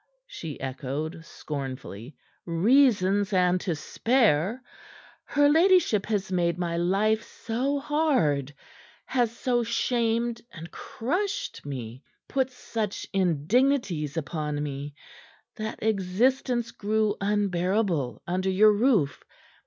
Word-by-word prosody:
she 165 - -7
echoed 140 +5 -4
scornfully. 135 -5 -7 0.3
"Reasons 205 +1 +3
and 180 -1 +3
to 175 - -1
spare! 225 - +1 0.6
Her 290 0 +3
ladyship 325 - +4
has 200 -3 -1
made 170 -2 +1
my 170 -1 -2
life 200 +6 +2
so 255 +6 -2
hard, 260 - +1 0.5
has 240 -3 0
so 245 -2 +1
shamed 235 0 0
and 165 -1 -10
crushed 375 - -3
me, 125 -3 -6 0.3
put 265 -1 0
such 225 -4 -4
indignities 185 - +1
upon 150 -1 -2
me, 140 0 -5 0.6
that 220 0 -4
existence 230 +4 +1
grew 215 0 0
unbearable 190 - 0
under 185 +2 -1
your 210 +3 +6
roof. 205 - +2
200 Hz, 100 wpm, -26 LUFS, 160-240 Hz, 0.6 s, your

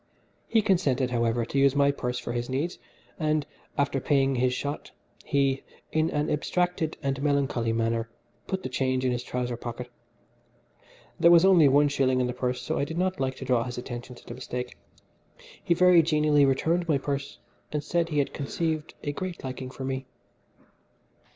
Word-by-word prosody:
He 225 -2 +3
consented, 140 -10 +1
however, 115 -1 +1
to 140 - -1
use 140 0 +4
my 140 0 +4
purse 125 -3 -3
for 125 - -5
his 120 +1 -3
needs, 145 +7 -2 0.4
and, 155 -2 +1 0.3
after 140 -1 +1
paying 135 0 +2
his 125 0 +2
shot, 145 +3 -4 0.3
he, 135 -1 +1 0.3
in 155 +1 +2
an 150 +1 -1
abstracted 165 +2 -1
and 135 0 -1
melancholy 140 -5 +1
manner, 115 0 0 0.4
put 190 -1 -3
the - - -2
change 130 0 0
in 125 - +2
his 120 0 -1
trouser 125 -1 -3
pocket. 120 +1 -7 1.3
There 170 - +6
was 170 +1 +7
only 180 -6 +7
one 145 +2 +5
shilling 135 -2 +1
in 125 - +2
the 125 - -2
purse 125 0 -2
so - - -1
I - - +1
did 160 +3 -4
not 185 +1 0
like 130 -1 -1
to 130 - -8
draw 125 -2 +2
his 125 0 -6
attention 125 0 -7
to - - -17
the - - -7
mistake. 125 0 -5 0.9
He 170 - +2
very 180 -1 +6
genially 150 -2 +3
returned 165 +6 +1
my 155 -4 +3
purse, 140 0 -4 0.3
and 150 -1 -2
said 170 +2 0
he 150 - -2
had 140 - +1
conceived 155 +2 -3
a 145 - -1
great 180 +4 -5
liking 130 0 -5
for 130 - -8
me. 130 0 -3
140 Hz, 185 wpm, -27 LUFS, 125-155 Hz, 1.3 s, was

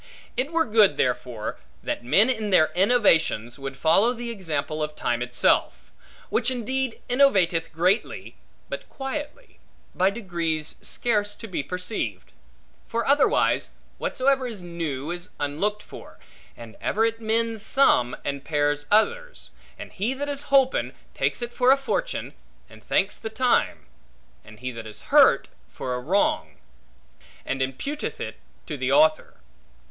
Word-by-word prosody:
It 265 +5 -1
were 330 0 +2
good, 215 -3 +4
therefore, 125 -3 -2 0.2
that - - -3
men 200 - +4
in 220 -5 -1
their 155 -5 +4
innovations 165 - +2
would 135 0 -6
follow 195 - +4
the 235 -1 -5
example 155 -7 -3
of 150 0 -3
time 120 -3 -1
itself; 125 0 +1 0.4
which - - +1
indeed 260 0 -2
innovateth 195 -11 +3
greatly, 180 +7 0 0.3
but - - -7
quietly, 290 - -6 0.3
by 185 +1 +3
degrees 170 -7 -3
scarce 205 -3 -1
to 225 - -9
be 185 -7 -2
perceived. 180 +7 -4 0.6
For 235 0 -2
otherwise, 280 0 +3 0.3
whatsoever 260 0 +1
is 215 -6 -7
new 165 -4 -4
is 175 +1 -5
unlooked 200 +9 -1
for; - - -12 0.4
and 115 -1 -11
ever 220 +2 +1
it 225 0 -2
mends 225 0 -1
some, 165 - +3
and 140 -1 -3
pairs 145 -1 0
others; - - +1 0.3
and - - -9
he 215 +6 -2
that 285 +2 -4
is 285 0 -2
holpen, 270 -1 +3 0.2
takes - - -1
it 240 0 -5
for 250 0 +4
a 275 - +6
fortune, - - -3 0.3
and - - -16
thanks - - +1
the 220 - -6
time; 245 - +1 0.6
and 110 +1 -15
he 125 0 -3
that 115 -2 -8
is 105 0 -8
hurt, - - +6 0.2
for 125 - -5
a 125 - -2
wrong, 250 - 0 0.9
and 135 - -2
imputeth 135 - -3
it - - -6 0.3
to - - -5
the - - -1
author. 310 +1 +3
205 Hz, 145 wpm, -25 LUFS, 150-250 Hz, 0.9 s, a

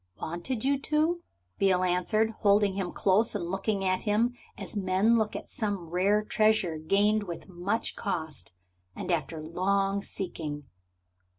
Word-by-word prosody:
"Wanted 175 +9 -3
you 280 0 +2
to?" 310 +4 +1 0.4
Beale 185 -2 +3
answered, 185 +5 +2
holding 205 -1 +4
him 190 -2 -2
close, 210 +4 +2
and 185 -4 -2
looking 195 0 -1
at 185 0 +1
him 225 +3 +2 0.2
as - - -5
men 195 +3 +3
look 220 -2 +1
at - - -6
some 200 -7 -3
rare 200 +4 +2
treasure 215 -8 +2
gained 205 +6 +3
with 175 -3 -7
much 190 +5 -2
cost 160 - -4 0.4
and - - -3
after 165 -1 -1
long 195 +5 0
seeking. 155 -7 -5
195 Hz, 140 wpm, -29 LUFS, 180-215 Hz, 0.4 s, holding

